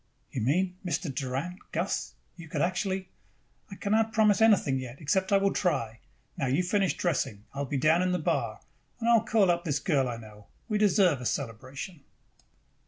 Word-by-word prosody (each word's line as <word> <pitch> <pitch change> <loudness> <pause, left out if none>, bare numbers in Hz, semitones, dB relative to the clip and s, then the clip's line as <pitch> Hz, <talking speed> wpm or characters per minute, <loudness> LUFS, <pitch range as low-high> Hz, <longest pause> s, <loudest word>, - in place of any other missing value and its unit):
"You 125 - -3
mean.... 180 - +1
Mr. 175 -4 -2
Doran 135 +8 -3
Gus - - -2 0.2
you 170 -2 -11
could 150 -3 0
actually 185 +1 -1 0.3
" - - -35
"I - - -6
cannot 220 +3 +1
promise 215 -1 +4
anything 195 -12 +4
yet 130 0 -8
except 190 +5 +1
that 200 - +4
I - - +7
will 200 - +2
try. 115 - -1 0.4
Now 140 -5 -1
you 135 +8 +2
finish 195 +1 +1
dressing. 130 - -1
I 140 - -6
will 140 - -2
be 140 - -1
down 155 +5 +4
in 185 0 +1
the 180 - +1
bar. 160 - -1 0.4
And 230 - -2
I 235 - +6
will 230 - +6
call 215 -5 +3
up 170 0 -1
this 145 -3 0
girl 140 -3 +1
I 120 - -4
know. 105 -2 -13 0.2
We 215 -3 0
deserve 185 - +4
a - - -6
celebration!" 135 - -5
170 Hz, 200 wpm, -28 LUFS, 135-195 Hz, 0.4 s, I